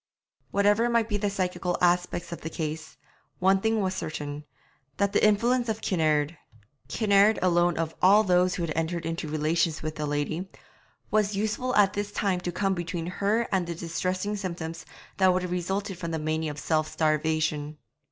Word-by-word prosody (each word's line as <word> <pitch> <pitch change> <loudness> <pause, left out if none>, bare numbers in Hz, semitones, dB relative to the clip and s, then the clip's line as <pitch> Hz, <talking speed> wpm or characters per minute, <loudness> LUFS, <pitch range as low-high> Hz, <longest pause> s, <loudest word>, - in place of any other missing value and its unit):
Whatever 205 +4 +3
might 235 -2 +2
be 210 -2 -1
the 205 0 0
psychical 180 -2 -2
aspects 175 -1 +1
of 170 - -6
the 160 - -5
case, 155 0 -5 0.4
one 190 +1 +3
thing 220 0 +1
was 190 -1 0
certain, 150 -4 -5 0.5
that 200 0 +1
the - - +2
influence 235 +3 +3
of 220 0 -1
Kinnaird 155 -3 +1 0.5
Kinnaird 205 0 +4
alone 175 -1 +2
of 165 -1 -2
all 205 +4 +6
those 180 -2 +3
who 175 - -3
had 160 -2 -2
entered 165 +1 -2
into 165 0 -3
relations 155 +1 0
with 155 0 -4
the 150 0 -2
lady 145 +5 -2 0.6
was 210 -1 +2
useful 220 +5 -1
at 200 -2 +5
this 205 0 -3
time 195 -3 0
to 175 - -3
come 195 +2 0
between 175 -1 -4 0.2
her 215 +4 +2
and 185 -3 +1
the 170 - -4
distressing 185 +4 -2
symptoms 170 -4 -5 0.3
that 190 -1 +5
would 180 0 0
have 180 - -4
resulted 190 +2 -2
from 170 -3 -4
the 165 - -2
mania 155 0 -1
of 150 - -7
self 155 0 0
starvation. 155 -1 0
180 Hz, 180 wpm, -27 LUFS, 160-200 Hz, 0.6 s, all